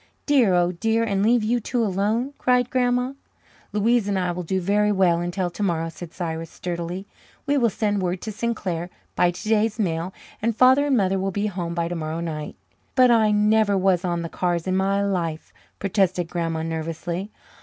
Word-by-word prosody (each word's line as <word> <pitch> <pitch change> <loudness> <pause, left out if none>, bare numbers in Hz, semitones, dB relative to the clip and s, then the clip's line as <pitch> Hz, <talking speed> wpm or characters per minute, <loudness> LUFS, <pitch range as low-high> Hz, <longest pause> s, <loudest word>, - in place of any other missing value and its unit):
"Dear, 250 -11 +4
oh 175 0 +3
dear, 225 +6 0
and 200 -3 0
leave 230 +2 +3
you 240 +3 +1
two 235 +1 -1
alone!" 215 +7 0
cried 250 -1 +2
Grandma. 250 0 +1 0.6
"Louise 220 +1 +2
and 200 -1 0
I 180 -1 0
will 180 +1 -4
do 190 +2 -1
very 205 +3 +2
well 185 -4 +3
until 175 +1 -2
tomorrow," 170 -4 -1
said 165 0 -9
Cyrus 165 -2 -4
sturdily. 175 +2 -5 0.4
"We 285 - +1
will 235 -2 +3
send 205 -1 -1
word 180 0 -1
to 220 - -4
Sinclair 195 -6 -3 0.3
by 180 - +4
today's 215 +4 0
mail, 175 -4 -1 0.3
and 230 +1 0
Father 260 +4 +5
and 270 -3 +3
Mother 195 -2 +1
will 195 +1 -1
be 205 +2 -2
home 175 -4 -3
by 170 -1 0
tomorrow 165 -1 -3
night." 155 -3 -5 0.4
"But 255 -2 +6
I 220 -2 +4
never 210 -1 +3
was 185 -1 +2
on 175 -2 -1
the - - -3
cars 175 0 -1
in 185 0 0
my 195 +1 +1
life," 170 -5 -2 0.2
protested 185 -3 0
Grandma 165 -2 -2
nervously. 165 +4 -4
190 Hz, 185 wpm, -23 LUFS, 175-220 Hz, 0.6 s, But